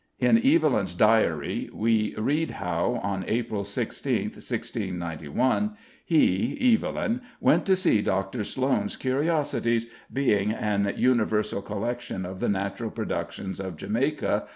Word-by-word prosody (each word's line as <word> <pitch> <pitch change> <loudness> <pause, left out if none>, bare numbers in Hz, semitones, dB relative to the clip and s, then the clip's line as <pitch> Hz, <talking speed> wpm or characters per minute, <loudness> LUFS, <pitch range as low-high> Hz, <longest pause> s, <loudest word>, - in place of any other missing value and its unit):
In 230 - +4
Evelyn's 265 - +3
Diary 105 -8 +2
we 110 -1 +1
read 145 +9 0
how, 90 +6 -1
on 95 -2 -2
April 115 -3 -1
16th, 100 0 -2
1691, 95 - -2 0.3
he 150 - +3
(Evelyn) 230 +2 0 0.2
"went - - +3
to 190 - +5
see 180 - +3
Dr. 95 +4 -1
Sloane's 130 -3 0
curiosities, 135 -4 0 0.3
being 105 -7 +2
an 100 -2 0
universal 110 -5 +2
collection 110 -2 -4
of 95 +1 -7
the - - 0
natural 100 +3 -2
productions 95 -2 -4
of 95 -4 -5
Jamaica," 125 - 0
&c. - - -21
110 Hz, 120 wpm, -26 LUFS, 95-135 Hz, 0.3 s, to